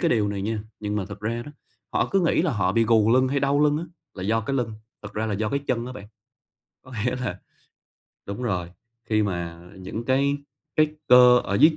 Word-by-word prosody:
cái 170 - +2
điều 110 -7 +2
này 100 -1 -3
nha, 110 +2 -1 0.2
nhưng 105 0 -2
mà 100 - -1
thực 100 +1 -9
ra 115 +2 -2
đó, 145 - -10 0.4
họ - - +2
cứ 195 - +3
nghĩ 165 -2 +2
là 170 -4 +1
họ 105 -4 +1
bị 115 0 +3
gù 110 -1 +4
lưng 130 +1 +4
hay 140 +1 0
đau 140 +1 +2
lưng 150 0 +4
á 165 - -4 0.3
là 95 - -7
do 110 +4 +1
cái 135 +5 -3
lưng, 120 -3 -1 0.3
thật 100 - -8
ra 110 +1 -2
là 105 - -1
do 105 +2 -1
cái 140 - 0
chân 120 -1 -1
á 130 - -6
bạn. 105 -4 -10 0.8
Có 130 - -13
nghĩa 125 0 0
là 125 -1 -4 0.9
đúng 100 +5 -5
rồi, 90 -7 -1 0.4
khi 110 -1 +3
mà 85 -4 -3 0.2
những 95 +5 -6
cái 140 +3 +2 0.4
cái 155 - +5 0.2
cơ 125 0 +8
ở 100 - -2
dưới 155 +10 +5
115 Hz, 235 wpm, -25 LUFS, 105-130 Hz, 0.9 s, cơ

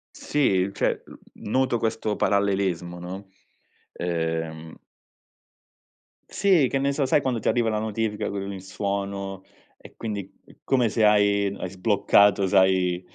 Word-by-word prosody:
Sì, 100 -10 +1
cioè - - -1
l - - -13
noto 130 0 +1
questo 110 -2 -1
parallelismo, 95 -4 0
no, 95 +3 -8 0.7
ehm 80 -2 -3 1.5
Sì, 185 -9 +3
che 135 - 0
ne 140 +1 +1
so, 140 -1 0
sai 145 - +3
quando 125 -4 -1
ti - - -5
arriva 120 -2 +2
la 105 -1 -1
notifica 110 -1 -2
con 100 0 -4
il 95 -2 -7
suono 100 0 -4 0.3
e - - -16
quindi 100 -4 -5
è - - -20
come 125 -4 +2
se 110 0 +2
hai 100 -1 +3
n 100 - -7
hai 90 - -5
sbloccato, 100 0 +3
sai, 95 -2 +3
100 Hz, 140 wpm, -25 LUFS, 95-110 Hz, 1.5 s, Sì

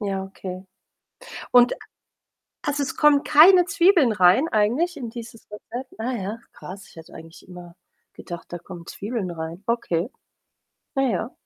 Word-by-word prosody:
Ja, 195 -2 -2
okay, 190 -1 -8 0.9
und 245 0 +6 0.9
also, 290 0 0
es 275 - -4
kommen 295 -2 +4
keine 350 +4 +7
Zwiebeln 355 - +4
rein 190 - +4
eigentlich 250 +12 +1
in 240 -5 -6
dieses 230 -1 -11
Rezept? 245 +5 -8
Ah 245 +3 -2
ja, 215 0 -4
krass. 195 +2 -10
Ich - - -20
hätte 165 - -13
eigentlich 165 +1 -13
immer 175 -2 -12 0.4
gedacht, 175 -1 -9
da - - -3
kommen 170 0 -11
Zwiebeln 205 -3 -4
rein. 165 +3 -7
Okay. 230 -6 -1 0.9
Ah, 270 - +2
ja. 230 -2 -1
220 Hz, 145 wpm, -23 LUFS, 180-270 Hz, 0.9 s, keine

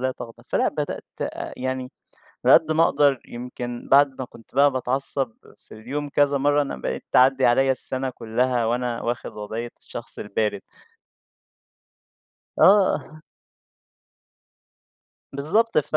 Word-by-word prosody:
لا 130 0 0
تغضَب." 115 -2 -11
فلا، - - +1
بدأت - - -4 0.5
يعني 130 0 -3 0.6
على - - +7
قد 160 -1 +5
ما 160 +1 +4
أقدَر، 140 -4 +3
يمكن 120 0 -7
بعد 140 -1 +5
ما 130 - -3
كنت 115 0 -18
بقى 140 0 +5
باتعصَّب 130 -1 -2 0.2
في - - -17
اليوم 140 +7 -5
كذا 145 0 +2
مرَّة، 145 +1 +2
أنا 140 - -4
بقيت - - -4
تعدِّي 130 +1 +5
عليّا 135 +2 +4
السنة 130 0 -3
كلها 120 +1 -1
وأنا 120 0 -1
واخِد 120 +1 -3
وضعية 110 +3 -6
الشخص - - -8
البارِد. 105 -1 -2 2.0
آه. 185 -6 +4 2.1
بالضبط 160 +12 +1
ف 155 +1 0
130 Hz, 125 wpm, -23 LUFS, 120-145 Hz, 2.1 s, على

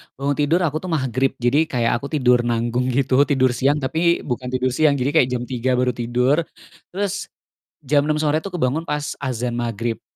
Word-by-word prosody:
bangun 140 +1 -1
tidur 155 +5 +2
aku, 155 -4 -1
tuh, 185 - -8
Magrib, 130 -4 0
jadi 135 +6 +1
kayak 120 -4 0
aku 140 - -6
tidur 125 -3 +4
nanggung, 120 +2 0
gitu, 130 +1 +1
tidur 130 -3 +2
siang 135 +4 +1
tapi 160 +5 0
bukan 125 -1 -4
tidur 130 0 -1
siang, 145 +2 +3
jadi 135 +1 0
kayak 125 - +4
jam 120 - -3
3.00 125 0 -1
baru 125 0 +1
tidur, 125 +4 +1 0.6
terus 200 0 -2 0.6
jam 145 +1 +3
6.00 150 +1 0
sore, 155 +1 +1
tuh, 200 - -6
kebangun 155 -3 -1
pas 150 -2 -3
azan 125 -2 -2
Magrib. 115 -1 -3
130 Hz, 190 wpm, -21 LUFS, 125-150 Hz, 0.6 s, tidur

